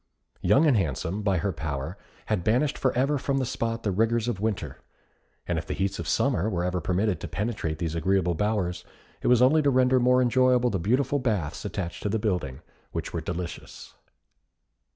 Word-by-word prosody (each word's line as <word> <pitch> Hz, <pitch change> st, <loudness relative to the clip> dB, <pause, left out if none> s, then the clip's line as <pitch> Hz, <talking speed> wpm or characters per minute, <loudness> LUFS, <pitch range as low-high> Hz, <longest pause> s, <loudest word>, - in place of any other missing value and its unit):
Young 145 Hz, +4 st, +4 dB
and 145 Hz, -5 st, +4 dB
Handsome, 95 Hz, -, -1 dB
by 100 Hz, -3 st, +1 dB
her 95 Hz, +3 st, -1 dB
power, 80 Hz, +1 st, -4 dB, 0.3 s
had 105 Hz, -5 st, -1 dB
banished 125 Hz, +8 st, +2 dB
for 130 Hz, -, +1 dB
ever 135 Hz, +3 st, +1 dB
from 140 Hz, 0 st, -1 dB
the 130 Hz, -, 0 dB
spot 115 Hz, -1 st, -3 dB
the 100 Hz, -, 0 dB
rigours 115 Hz, +4 st, +1 dB
of 115 Hz, -6 st, -2 dB
winter, 110 Hz, -1 st, -3 dB, 0.7 s
and 85 Hz, -2 st, -1 dB
if 75 Hz, -, -8 dB
the -, -, -3 dB
heats 95 Hz, 0 st, -1 dB
of 85 Hz, -, -4 dB
summer 95 Hz, +7 st, +1 dB
were 90 Hz, -4 st, -1 dB
ever 90 Hz, 0 st, -1 dB
permitted 95 Hz, +4 st, 0 dB
to -, -, -6 dB
penetrate 105 Hz, -7 st, -3 dB
these 80 Hz, -2 st, -3 dB
agreeable 90 Hz, +1 st, +1 dB
bowers, 90 Hz, -2 st, -1 dB, 0.4 s
it -, -, -1 dB
was 125 Hz, 0 st, +5 dB
only 155 Hz, +5 st, +5 dB
to 145 Hz, -, +3 dB
render 130 Hz, -1 st, +4 dB
more 125 Hz, +1 st, +4 dB
enjoyable 125 Hz, 0 st, +3 dB
the 95 Hz, -, -1 dB
beautiful 130 Hz, +9 st, +1 dB
baths 105 Hz, -, -2 dB
attached 85 Hz, -1 st, -4 dB
to 105 Hz, -, -1 dB
the 110 Hz, -, +1 dB
building, 90 Hz, -, -2 dB, 0.3 s
which -, -, -4 dB
were -, -, -2 dB
delicious. 85 Hz, -1 st, -6 dB
105 Hz, 195 wpm, -26 LUFS, 90-125 Hz, 0.7 s, was